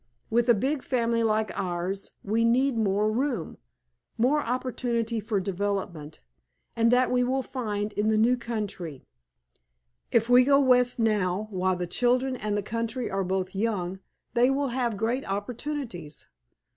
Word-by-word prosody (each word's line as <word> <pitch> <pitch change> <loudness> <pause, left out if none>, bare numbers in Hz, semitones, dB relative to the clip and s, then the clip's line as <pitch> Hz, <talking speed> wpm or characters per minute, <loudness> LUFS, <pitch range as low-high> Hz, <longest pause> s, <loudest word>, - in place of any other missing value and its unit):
With 240 +2 +2
a 240 - +7
big 270 +7 -1
family 235 -3 0
like 215 -1 +1
ours 185 0 -3
we 220 +3 +1
need 255 +3 +3
room, 215 - 0 0.6
more 260 +6 +3
opportunity 235 -2 -1
for 215 -1 -1
development, 190 -5 -3 0.5
and 230 0 +3
that 250 +1 +3
we 250 0 +3
will 260 +2 0
find 210 -5 -3
in 210 +1 0
the 220 0 +3
new 235 +3 +4
country. 205 - -5 1.1
If 230 -1 +3
we 245 +1 +7
go 275 +1 +5
west 250 -2 +4
now, 210 -3 +1
while 185 -1 +1
the 180 0 -3
children 250 +6 +1
and 210 -4 -2
the 205 - -2
country 230 +3 -3
are 195 0 0
both 185 0 -2
young 190 -3 -2 0.3
they 245 +1 +4
will 275 0 0
have 240 -3 -1
great 235 +5 -1
opportunities. 205 - -5
225 Hz, 145 wpm, -27 LUFS, 200-250 Hz, 1.1 s, a